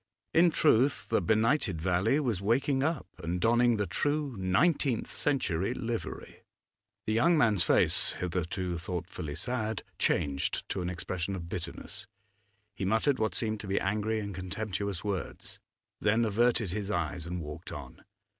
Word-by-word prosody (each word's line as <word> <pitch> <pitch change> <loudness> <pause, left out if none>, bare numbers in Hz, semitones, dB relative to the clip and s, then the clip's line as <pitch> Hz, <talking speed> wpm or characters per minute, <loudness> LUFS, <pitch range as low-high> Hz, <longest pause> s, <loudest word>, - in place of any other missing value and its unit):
In 170 +2 +6
truth, 140 -4 +3
the - - +2
benighted 110 - +2
valley 95 - +2
was 120 -10 -1
waking 130 +6 +2
up 155 +1 0
and 85 +2 -2
donning 120 +2 +4
the 105 - 0
true 145 +2 -1
nineteenth 110 - +1
century 120 - 0
livery. 115 -1 -5 0.6
The 110 - 0
young 160 +10 +4
man's 110 - +4
face, - - +4
hitherto 90 0 -2
thoughtfully 85 -3 -5
sad, 110 -3 -2 0.2
changed 70 -1 0
to 95 - -2
an 90 - -2
expression 90 +1 -3
of 85 -2 -6
bitterness; 85 -1 -5 0.7
he 95 - -5
muttered 110 +8 +2
what 110 0 0
seemed 110 -2 0
to 105 - -7
be 95 - +1
angry 110 +3 0
and 100 -1 -4
contemptuous 95 0 -3
words, 100 -5 -4 0.4
then 110 +2 +3
averted 115 -2 +2
his 100 +1 -3
eyes 85 -3 -2
and 90 +1 -3
walked 75 +1 -7
on. - - -9
105 Hz, 145 wpm, -30 LUFS, 90-120 Hz, 0.7 s, In